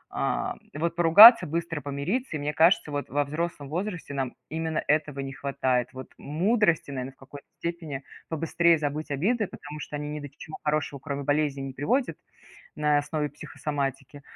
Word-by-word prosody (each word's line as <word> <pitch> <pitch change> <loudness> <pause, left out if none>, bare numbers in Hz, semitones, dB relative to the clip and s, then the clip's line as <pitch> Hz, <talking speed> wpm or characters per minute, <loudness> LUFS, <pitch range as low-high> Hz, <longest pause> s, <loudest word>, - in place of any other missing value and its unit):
а, - - -1 0.2
вот 165 +2 -1
поругаться, 180 +5 +9
быстро 165 0 -3
помириться, 155 - -3
и 150 - -2
мне 150 +1 -2
кажется, 165 -2 +4
вот 145 0 -3
во 145 +2 +1
взрослом 155 0 -4
возрасте 175 -1 -4
нам 135 -3 -3
именно 160 0 -2
этого 150 -2 +1
не 135 0 -5
хватает. 130 -2 0
Вот 130 0 -10
мудрости, 170 +1 +1
наверно, 130 -1 -5
в - - -33
какой-то 140 +2 -13
степени 165 -5 -5 0.3
побыстрее 165 +1 +2
забыть 150 +1 -3
обиды, 205 - 0
потому 150 -2 -9
что 150 - -6
они 150 0 -4
ни 150 - -4
до 145 -1 -8
чего 155 - -9
хорошего, 150 -2 -1
кроме 140 0 -4
болезней, 145 -1 0
не 135 -1 -6
приводят 245 - 0 0.6
на 150 -1 +2
основе 150 0 -2
психосоматики. 140 -1 -5
150 Hz, 165 wpm, -27 LUFS, 140-165 Hz, 0.6 s, поругаться